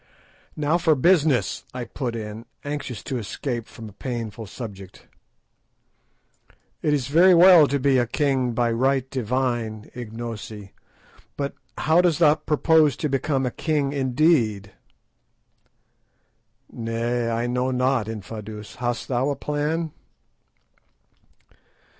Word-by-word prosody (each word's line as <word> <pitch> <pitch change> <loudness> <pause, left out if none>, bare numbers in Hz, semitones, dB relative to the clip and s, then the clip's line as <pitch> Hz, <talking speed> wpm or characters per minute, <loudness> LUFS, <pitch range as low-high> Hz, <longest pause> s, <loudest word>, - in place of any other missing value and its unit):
"Now 155 +3 +1
for 165 -3 +3
business," 145 - +2
I 125 - -3
put 120 0 -4
in, 110 +1 -7 0.2
anxious 140 -8 -5
to 130 - -3
escape 120 +2 -4
from 115 -2 -10
a - - -11
painful 115 -2 -5
subject. 100 -4 -9 1.8
"It 150 - +1
is 145 -4 +1
very 175 +7 +6
well 175 -3 +8
to 140 - 0
be 135 -1 +3
a 120 - +1
king 130 -2 0
by 120 0 +1
right 130 +2 +1
divine, 120 -3 -2
Ignosi, 110 -3 -7 0.6
but 140 -1 -2 0.2
how 160 +3 +4
dost 175 -4 +2
thou 155 -3 +6
propose 155 -2 +3
to 150 - -2
become 135 0 0
a 125 - -1
king 145 -2 -1
indeed?" 130 - +1 2.0
"Nay, 115 +1 -2
I 115 +1 -1
know 125 +1 0
not. 125 -3 +1
Infadoos, 105 0 -8
hast 120 -1 -2
thou 130 +2 0
a 140 - -1
plan?" 150 +3 -2
125 Hz, 120 wpm, -24 LUFS, 115-145 Hz, 2.0 s, well